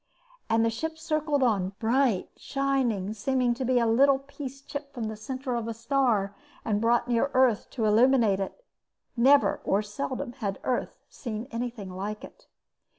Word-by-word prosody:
And 225 0 +3
the 230 - +1
ship 320 +8 -4
circled 310 -3 0
on, 200 -6 +1
bright, 235 -3 +1
shining, 260 -8 -1
seeming 250 +2 +1
to 255 +2 -4
be 255 0 +2
a 235 - +3
little 265 +5 +5
piece 275 0 -8
clipped 285 0 -7
from 240 - -3
the 220 - -5
center 255 +4 -4
of 235 -1 -2
a 230 - -4
star 230 -5 +1 0.3
and 210 -2 0
brought 235 +1 +2
near 240 +3 +2
Earth 255 -5 +3
to 230 -4 -2
illuminate 225 -2 +4
it. 200 - -5 0.5
Never, 270 +4 +4
or 200 +2 +1
seldom, 255 +5 -4
had 200 -5 -3
Earth 250 - -2
seen 230 -1 -6
anything 230 -5 -4
like 210 +3 -5
it. - - -13
240 Hz, 165 wpm, -27 LUFS, 215-270 Hz, 0.5 s, little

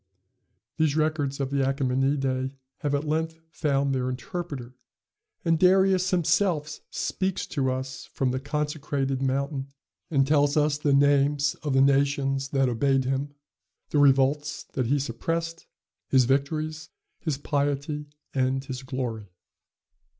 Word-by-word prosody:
These 155 -2 +2
records 155 -3 0
of 135 -1 -2
the 140 - 0
Achæmenidæ 135 0 0 0.2
have 145 -2 0
at 140 - -1
length 160 +1 -1
found 140 -2 +1
their 130 -1 0
interpreter; 130 -1 -5 0.7
and 165 -1 +3
Darius 185 0 +4
himself 170 -3 +1
speaks 190 -1 -2
to 135 -3 -1
us 130 0 -4
from 130 -2 0
the 130 - -1
consecrated 145 -2 -2
mountain, 135 +1 -1 0.4
and 135 -4 +3
tells 145 0 +3
us 150 -1 +2
the 150 -1 +1
names 140 +1 +3
of 150 -3 -1
the 135 - +5
nations 135 0 +2
that 135 -1 +2
obeyed 135 +2 +2
him, 135 +2 -2 0.6
the 150 - +2
revolts 140 +1 +3
that 130 -3 0
he 140 +4 +2
suppressed, 165 +6 -3 0.4
his 130 -2 +4
victories, 155 +4 -1 0.3
his 155 -5 -2
piety, 145 +1 -1 0.3
and 130 0 0
his 130 -1 -5
glory. 125 -5 -4
140 Hz, 130 wpm, -26 LUFS, 135-150 Hz, 0.7 s, the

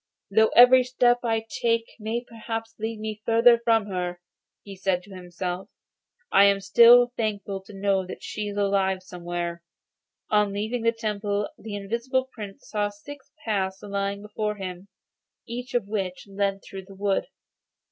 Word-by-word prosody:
'Though 220 +2 +5
every 250 +1 +8
step 245 -1 +3
that 240 - -3
I 225 0 0
take 230 0 0 0.2
may 225 +3 -3
perhaps 225 0 -5
lead 220 0 -3
me 215 -1 -5
further 230 +1 +5
from 225 -2 +2
her,' 180 -3 -3 0.4
he 200 -1 -9
said 185 -1 0
to 195 - -13
himself, 180 +1 -5 0.6
'I 200 +1 +7
am 200 0 +4
still 235 +5 +7
thankful 205 -3 -2
to 200 +2 -14
know 195 -1 0
that - - -8
she 210 -1 -4
is 205 0 -5
alive 195 -2 +1
somewhere.' 175 -1 -5 0.7
On 210 -1 +3
leaving 220 +4 -2
the 230 0 +3
temple 210 -2 -2
the 215 -2 -7
Invisible 235 +6 -1
Prince 205 -5 -9
saw 210 -1 -1
six 280 +7 -12
paths 190 -3 -1
lying 200 0 -3
before 210 0 -3
him, 185 -1 -7 0.6
each 245 +2 -6
of 240 -4 +1
which 190 -4 -3
led 195 0 -1
through 190 -1 -9
the 195 0 -13
wood. 200 0 0
205 Hz, 160 wpm, -25 LUFS, 195-225 Hz, 0.7 s, every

